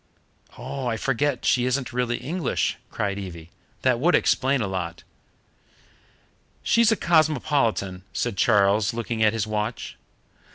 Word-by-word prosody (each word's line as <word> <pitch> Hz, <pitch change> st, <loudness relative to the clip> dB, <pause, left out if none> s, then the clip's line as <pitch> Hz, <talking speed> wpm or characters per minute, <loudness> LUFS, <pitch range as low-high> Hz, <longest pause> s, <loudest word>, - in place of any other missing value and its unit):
" -, -, -40 dB
"Oh, 130 Hz, +1 st, -5 dB
I 115 Hz, -2 st, -1 dB
forget 135 Hz, +1 st, -1 dB
she 125 Hz, -1 st, +3 dB
isn't 130 Hz, -1 st, -2 dB
really 120 Hz, -1 st, 0 dB
English," 160 Hz, +3 st, -1 dB
cried 100 Hz, -1 st, -2 dB
Evie. 85 Hz, -4 st, -9 dB, 0.3 s
"That 125 Hz, -2 st, +2 dB
would 165 Hz, +4 st, +4 dB
explain 135 Hz, +1 st, +2 dB
a 110 Hz, -, -1 dB
lot." 85 Hz, -3 st, -4 dB, 1.6 s
"She's 230 Hz, 0 st, +4 dB
a -, -, +4 dB
cosmopolitan," 145 Hz, -, +1 dB
said 120 Hz, -4 st, -2 dB
Charles, 100 Hz, +1 st, +3 dB
looking 115 Hz, -1 st, -3 dB
at 110 Hz, 0 st, +4 dB
his 110 Hz, -1 st, -1 dB
watch. 110 Hz, +2 st, -4 dB
120 Hz, 135 wpm, -24 LUFS, 105-140 Hz, 1.6 s, would